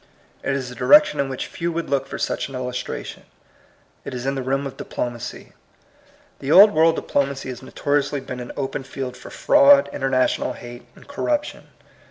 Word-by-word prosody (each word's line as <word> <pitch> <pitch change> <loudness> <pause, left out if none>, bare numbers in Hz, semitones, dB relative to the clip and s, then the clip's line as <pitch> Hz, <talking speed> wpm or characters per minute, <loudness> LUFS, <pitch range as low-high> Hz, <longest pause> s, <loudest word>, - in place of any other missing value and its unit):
It 135 - -1
is 130 -2 -4
a - - -8
direction 300 - +5
in 140 -1 0
which 130 - -4
few 170 0 -4
would 170 0 -3
look 135 -1 -1
for - - -6
such - - -2
an 135 - -8
illustration. 125 0 -5 0.8
It - - -6
is 125 0 -5
in 135 - 0
the 135 - -3
realm 135 +2 -1
of 135 - -6
di - - -7
plomacy. 120 0 -6 0.9
The 135 - -3
old 200 +5 +9
world 160 +1 +4
diplomacy 140 -3 -2
has 125 -1 -7
notoriously 145 +1 -1
been 130 -1 -7
an 125 - -7
open 135 -1 -3
field 130 -1 -6
for - - -12
fraud, 285 -1 +5
international 135 -1 0
hate, 120 0 -11
and - - -17
corruption. 295 +1 -3
135 Hz, 185 wpm, -22 LUFS, 130-160 Hz, 0.9 s, old